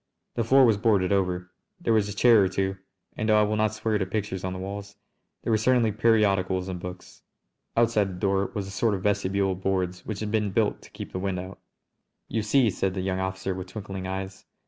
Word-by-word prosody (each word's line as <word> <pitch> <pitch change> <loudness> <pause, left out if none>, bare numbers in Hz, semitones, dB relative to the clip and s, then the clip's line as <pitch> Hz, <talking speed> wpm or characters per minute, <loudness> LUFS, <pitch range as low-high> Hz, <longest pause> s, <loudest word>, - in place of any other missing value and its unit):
The 115 - 0
floor 130 +4 +6
was 110 -4 +4
boarded 100 -4 +2
over. 90 -2 0 0.3
There 160 -10 +1
was 105 -2 +2
a 100 - -6
chair 115 -1 +6
or - - +3
two, 95 0 -1 0.4
and 110 - -2
though 105 0 +6
I - - +5
will 105 +1 0
not 110 0 +1
swear 110 -1 0
to 95 - 0
pictures 95 -2 -3
on 95 - -2
the 95 - -5
walls 100 +1 -6 0.5
there - - -1
were 110 - +4
certainly 120 -1 +3
periodicals 100 -4 +2
and 90 -1 -4
books. 90 +1 -9 0.6
Outside 115 -4 +3
the - - -7
door 100 0 +1
was 100 -2 -2
a 95 - -8
sort 105 +2 +1
of 95 - -6
vestibule 100 -1 +1
of 95 0 -5
boards 90 -2 -1
which 105 -2 -5
had 105 -1 -3
been 105 -2 +1
built 105 +2 0
to - - -15
keep - - -8
the 95 - -3
wind 95 -1 -2
out. 95 +1 -8 0.7
"You 115 - -1
see!" 115 +1 +3
said 95 0 -1
the 95 - -2
young 95 0 -1
officer 95 0 -2
with 95 0 -6
twinkling 95 -1 -6
eyes. 95 0 -5
100 Hz, 230 wpm, -26 LUFS, 95-110 Hz, 0.7 s, floor